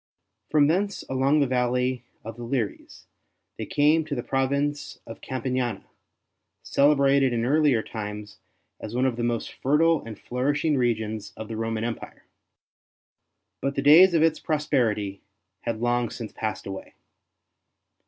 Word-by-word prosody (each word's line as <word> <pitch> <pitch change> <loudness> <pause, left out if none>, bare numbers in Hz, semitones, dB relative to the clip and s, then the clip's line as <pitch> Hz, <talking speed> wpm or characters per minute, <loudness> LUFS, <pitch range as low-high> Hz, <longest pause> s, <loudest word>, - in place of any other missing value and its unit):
From 150 -2 +4
thence 190 +6 0
along 135 +3 +2
the - - +4
valley 125 0 0 0.2
of 115 0 -7
the 120 - -8
Liris, 115 -3 -4 0.5
they - - -4
came 150 +3 +3
to 150 -2 -4
the 120 - -3
province 140 +2 -1
of 115 - -10
Campania, 125 -4 -2 0.8
celebrated 140 -2 +3
in 115 0 0
earlier 140 -4 +3
times 105 -1 -7 0.4
as 110 - -7
one 125 +1 +2
of 130 -3 +1
the 120 - -4
most 120 -1 -2
fertile 160 +4 +2
and 110 -2 -8
flourishing 145 +6 0
regions 110 -4 -1
of 110 0 -7
the 110 - -4
Roman 115 0 -2
Empire. 115 -1 -6 1.4
But 140 0 -2
the 135 - -1
days 170 +5 +7
of 160 - +4
its 160 -1 +2
prosperity 120 -10 -1 0.4
had 115 -1 -2
long 120 -1 +1
since 115 -3 -7
passed 110 -1 -4
away. 95 -1 -8
125 Hz, 145 wpm, -25 LUFS, 115-145 Hz, 1.4 s, days